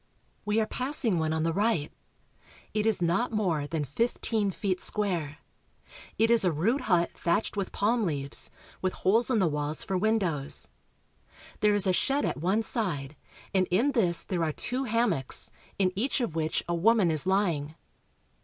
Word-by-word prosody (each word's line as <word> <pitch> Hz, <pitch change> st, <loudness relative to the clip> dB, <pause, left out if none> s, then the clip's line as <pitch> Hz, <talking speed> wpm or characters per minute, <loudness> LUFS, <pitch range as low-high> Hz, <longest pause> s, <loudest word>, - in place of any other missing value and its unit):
We 210 Hz, +1 st, +1 dB
are 220 Hz, -, +2 dB
passing 250 Hz, -, +1 dB
one 160 Hz, 0 st, -1 dB
on 160 Hz, 0 st, -1 dB
the 165 Hz, 0 st, 0 dB
right. 200 Hz, -6 st, 0 dB, 0.8 s
It 215 Hz, 0 st, 0 dB
is 215 Hz, -5 st, +3 dB
not 175 Hz, +10 st, +1 dB
more 175 Hz, -10 st, -1 dB
than 155 Hz, -1 st, -2 dB
fifteen 220 Hz, -, -1 dB
feet 190 Hz, -1 st, -2 dB
square. 175 Hz, -8 st, 0 dB, 0.8 s
It 225 Hz, +1 st, +3 dB
is 235 Hz, -3 st, +5 dB
a 180 Hz, -, +2 dB
rude 210 Hz, -, 0 dB
hut 175 Hz, -2 st, +2 dB
thatched 175 Hz, +7 st, -1 dB
with 195 Hz, -2 st, -3 dB
palm 230 Hz, +4 st, +1 dB
leaves, 140 Hz, -8 st, 0 dB, 0.3 s
with 185 Hz, -1 st, -1 dB
holes 225 Hz, +7 st, +2 dB
in 250 Hz, -, +2 dB
the 190 Hz, -4 st, +3 dB
walls 150 Hz, 0 st, -2 dB
for 195 Hz, -, -3 dB
windows. 180 Hz, -8 st, 0 dB, 0.9 s
There 210 Hz, -1 st, +3 dB
is 205 Hz, -, +3 dB
a 185 Hz, -, +2 dB
shed 275 Hz, +9 st, +1 dB
at -, -, -2 dB
one 190 Hz, +8 st, 0 dB
side, 160 Hz, -, -1 dB, 0.4 s
and 185 Hz, -2 st, +2 dB
in 230 Hz, +11 st, +2 dB
this 180 Hz, -10 st, +4 dB
there 180 Hz, -4 st, -2 dB
are 160 Hz, -, 0 dB
two 255 Hz, -, -1 dB
hammocks, 230 Hz, -, +1 dB, 0.3 s
in 185 Hz, -2 st, +1 dB
each 245 Hz, +9 st, 0 dB
of 235 Hz, -9 st, -2 dB
which 160 Hz, 0 st, -1 dB
a 175 Hz, -, -1 dB
woman 195 Hz, +1 st, +3 dB
is 155 Hz, +3 st, -1 dB
lying. 170 Hz, -6 st, 0 dB
190 Hz, 175 wpm, -28 LUFS, 165-220 Hz, 0.9 s, is